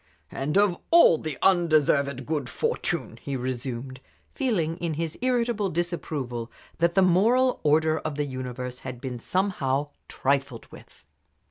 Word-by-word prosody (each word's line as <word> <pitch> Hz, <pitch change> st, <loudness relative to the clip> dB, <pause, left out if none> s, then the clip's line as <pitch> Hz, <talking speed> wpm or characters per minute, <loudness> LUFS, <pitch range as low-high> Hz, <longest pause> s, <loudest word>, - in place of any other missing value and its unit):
"And 150 Hz, +6 st, -1 dB
of 200 Hz, -3 st, +3 dB
all 330 Hz, -, +6 dB
the 155 Hz, -3 st, -5 dB
undeserved 150 Hz, -7 st, +3 dB
good 145 Hz, -4 st, -2 dB
fortune!" -, -, -2 dB
he 140 Hz, -1 st, -3 dB
resumed, 130 Hz, 0 st, -5 dB, 0.3 s
feeling 180 Hz, -, 0 dB
in 170 Hz, -3 st, -3 dB
his 165 Hz, 0 st, -3 dB
irritable 240 Hz, -5 st, +1 dB
disapproval 150 Hz, -9 st, -3 dB, 0.3 s
that 170 Hz, +1 st, +2 dB
the 190 Hz, -, +5 dB
moral 230 Hz, +9 st, +3 dB
order 155 Hz, +1 st, +3 dB
of 155 Hz, -2 st, -4 dB
the 145 Hz, 0 st, -1 dB
universe 125 Hz, -1 st, -6 dB
had 125 Hz, -2 st, -7 dB
been 125 Hz, -2 st, -5 dB
somehow 145 Hz, -5 st, 0 dB, 0.2 s
trifled 135 Hz, -3 st, -1 dB
with. -, -, -16 dB
155 Hz, 135 wpm, -26 LUFS, 130-180 Hz, 0.3 s, all